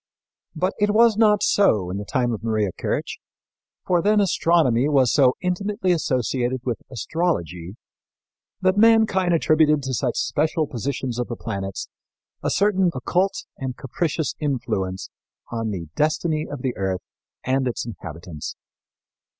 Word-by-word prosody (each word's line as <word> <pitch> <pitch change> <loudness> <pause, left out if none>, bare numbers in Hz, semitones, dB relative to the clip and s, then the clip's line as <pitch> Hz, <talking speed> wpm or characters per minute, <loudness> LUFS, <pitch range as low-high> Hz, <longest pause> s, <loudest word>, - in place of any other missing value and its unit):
But 185 +4 0
it 205 0 +2
was 230 -1 +6
not 210 -2 +4
so 105 - +3
in 95 - -3
the 105 - -6
time 125 -1 0
of 110 - -6
Maria 110 -4 0
Kirch, - - -3 0.7
for 175 -2 +2
then 210 +3 +3
astronomy 165 - +3
was 135 -4 +3
so 130 -3 +4
intimately 190 +2 -1
associated 130 -5 0
with 120 -3 -2
astrology 105 - -2 0.9
that 185 +1 +2
mankind 220 -5 +4
attributed 155 -2 +3
to 130 0 -3
such 125 0 -1
special 155 +1 0
positions 130 -1 -3
of 125 - -1
the 120 - -4
planets 100 -4 -5 0.5
a - - -1
certain 195 -2 +2
occult 180 +9 0
and 130 -1 -4
capricious 155 +3 -2
influence 95 -10 -2 0.4
on 115 -1 -2
the 90 -5 -5
destiny 155 +1 0
of 140 -3 -7
the 130 -2 -1
earth 95 -2 -1 0.4
and 130 0 +1
its 120 - -3
inhabitants. 85 -7 -7
135 Hz, 140 wpm, -23 LUFS, 115-180 Hz, 0.9 s, was